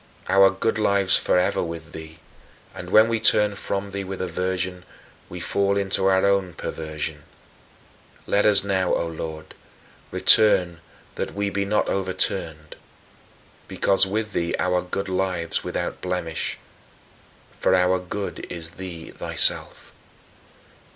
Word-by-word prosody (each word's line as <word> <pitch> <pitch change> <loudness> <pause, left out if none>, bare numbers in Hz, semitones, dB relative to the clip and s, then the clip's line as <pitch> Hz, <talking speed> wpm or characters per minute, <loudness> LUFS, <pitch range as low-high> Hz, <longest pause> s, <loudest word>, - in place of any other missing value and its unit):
Our 95 0 +6
good 110 +3 -1
lives 100 -2 +3
forever 90 0 +1
with 85 -1 -6
thee, 80 0 -10 0.6
and - - -8
when 110 +1 +6
we 115 -1 0
turn 105 -2 +4
from 100 0 -4
thee 100 0 -4
with 95 0 -6
aversion, 90 0 -3 0.5
we 90 - -7
fall 100 +3 0
into 95 -1 0
our 95 0 +3
own 100 -3 +1
perversion. 75 -1 -5 1.0
Let 105 - +2
us 105 -2 +4
now, 95 -2 0
O - - -1
Lord, 80 -1 -7 0.6
return 90 -6 +5 0.3
that - - -5
we 100 0 -1
be 100 0 -1
not 105 +2 0
overturned, 95 -5 -2 0.9
because 95 0 +3
with 105 +2 -3
thee 85 0 -1
our 90 0 +1
good 100 +2 -4
lives 90 -3 -1
without - - -4
blemish 90 -3 -3 1.0
for 95 - +3
our 90 0 +2
good 95 +3 -6
is 85 -1 -6
thee 85 -3 -8
thyself. - - -1
95 Hz, 130 wpm, -23 LUFS, 85-100 Hz, 1.0 s, Our